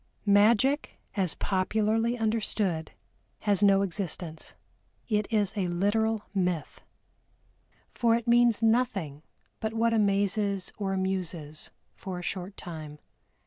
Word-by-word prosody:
Magic, 220 +8 +3 0.2
as 190 -5 0
popularly 215 +4 0
understood, 215 -7 -1 0.5
has 205 -3 +2
no 200 -1 +5
existence, 175 -4 -3 0.5
it 210 -2 0
is 210 -3 +1
a 195 -3 0
literal 210 +5 +1
myth 180 -5 -2 1.1
for 230 -1 +3
it 235 0 -3
means 235 -2 +4
nothing 220 - +1 0.4
but 220 0 -3
what 230 0 +2
amazes 200 -2 +1
or 195 -2 -1
amuses 180 -5 -3 0.2
for 185 -2 -6
a 180 - -6
short 190 +2 -5
time. 155 -3 -8
200 Hz, 110 wpm, -28 LUFS, 180-220 Hz, 1.1 s, no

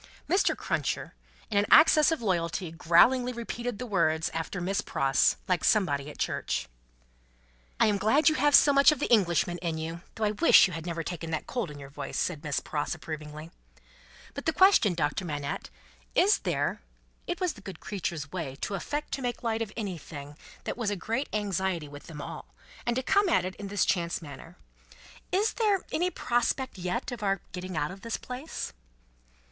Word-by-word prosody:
Mr. 375 +3 +2
Cruncher, - - -2 0.4
in 200 - +3
an 205 - +1
access 310 0 +7
of 320 -7 -2
loyalty, 170 -3 -1
growlingly 240 +10 +4
repeated 235 -1 -4
the 250 - -5
words 165 -7 +1
after 165 +3 -3
Miss 190 +3 -1
Pross, 135 0 +2
like 180 -3 +1
somebody 150 -9 +2
at - - -11
church. - - -2 1.1
"I - - +6
am 205 -2 +2
glad 225 +10 +3
you 310 - +6
have 290 0 +4
so 285 - +7
much 275 +2 +7
of 305 - -1
the - - -1
Englishman 175 -5 +3
in 165 -2 -2
you, 165 +2 -5
though 220 - -3
I 210 - +2
wish 270 +11 +7
you 185 - -3
had 165 +1 -6
never 165 -1 -3
taken 165 0 -5
that 160 -1 -2
cold 235 -9 -3
in 145 - -9
your 140 -1 -10
voice," 145 0 -5
said 155 - -1
Miss 150 -2 -1
Pross, 150 +3 -3
approvingly. 155 0 -8 0.8
"But - - -6
the 320 - +3
question, 375 - +5
Doctor 150 +3 -1
Manette. 145 -3 -4 0.5
Is 405 +3 +5
there" - - -1 0.5
it 350 - -3
was 365 -3 0
the 205 - -14
good 195 -1 -9
creature's 165 -7 -4
way 160 -8 -4
to - - -3
affect 295 +9 -3
to 275 - -3
make 245 -1 -3
light 225 -1 0
of 220 -3 -3
anything 160 -8 -6 0.3
that - - -4
was 230 -4 -1
a 205 - -1
great 230 +9 -2
anxiety 190 -6 -1
with 145 0 -11
them 150 -3 -7
all, - - -9 0.3
and 240 - +1
to 260 - -1
come 400 +6 +3
at 335 - +3
it 185 - -4
in 200 - -6
this 200 0 +1
chance 170 -2 0
manner 160 +3 -11 0.7
"is 410 +4 +2
there 415 -5 +2
any 355 +3 +1
prospect 240 - -1
yet, 230 +8 -2
of 240 -2 -6
our 195 -2 +1
getting 180 -1 -5
out 150 +1 -1
of 195 +1 -11
this 230 0 -3
place?" 255 - -6
195 Hz, 195 wpm, -28 LUFS, 165-245 Hz, 1.1 s, access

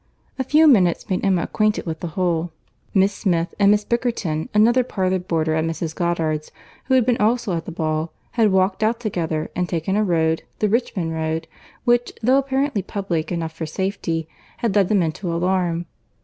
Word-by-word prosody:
A - - +2
few 300 +5 +4
minutes 190 - +4
made 185 - 0
Emma 190 -4 +2
acquainted 215 0 0
with 160 -2 -4
the 175 - -4
whole. 175 -2 0 0.4
Miss 195 +1 +3
Smith, 175 -5 0
and 200 -1 +5
Miss 210 0 +3
Bickerton, 225 -10 -1
another 235 +4 +4
parlour 190 -5 -1
boarder 160 -3 -1
at 160 0 +1
Mrs. 165 0 -3
Goddard's, 160 -3 -1 0.3
who 260 - +2
had 255 -3 +4
been 245 -1 +2
also 220 -3 +1
at 165 0 -4
the - - -6
ball, 155 -1 -2 0.2
had 225 -3 +3
walked 190 +1 +2
out 225 +2 +1
together, 165 -8 -2
and 180 -1 -1
taken 170 +3 -1
a 215 - +2
road, 160 -4 +1 0.2
the 210 - +1
Richmond 195 -7 -1
road, 160 0 -2 0.4
which, 240 0 +2
though 260 +4 +5
apparently 275 -3 0
public 185 -4 -3
enough 165 -2 -2
for 160 0 -5
safety, 165 -2 -2 0.3
had 225 -4 -1
led 200 -3 +3
them 200 -4 +3
into 170 +3 -3
alarm. 175 0 0
185 Hz, 185 wpm, -22 LUFS, 165-215 Hz, 0.4 s, and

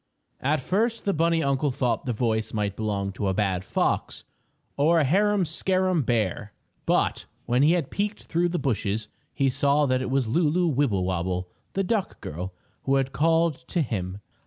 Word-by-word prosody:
At 145 +2 +1
first 225 - 0
the 200 - +2
bunny 165 +1 +2
uncle 140 +1 +1
thought 125 -2 -1
the - - +1
voice 110 -1 -1
might 100 -2 -1
belong 100 -2 -2
to 100 +1 -3
a 95 - 0
bad 95 -3 0
fox - - -1 0.5
or 160 +4 +4
a - - +3
harum 200 +6 +3
scarum 185 +2 +1
bear, 105 -4 -1 0.3
but - - +1 0.2
when 125 +1 +2
he 155 +4 +5
had 170 -6 -1
peeked 210 +1 -2
through 175 +1 0
the 175 - -1
bushes 105 - -1 0.2
he 135 - +1
saw 140 +3 +2
that 130 -1 +1
it 130 - -3
was 130 -2 +1
Lulu 165 +6 +2
Wibblewobble, 95 - 0 0.2
the 195 - 0
duck 195 0 -1
girl, 90 +5 -5 0.3
who 135 - +3
had 135 -1 +1
called 160 -1 +1
to 170 - 0
him. 95 -5 -4
135 Hz, 175 wpm, -26 LUFS, 105-165 Hz, 0.5 s, he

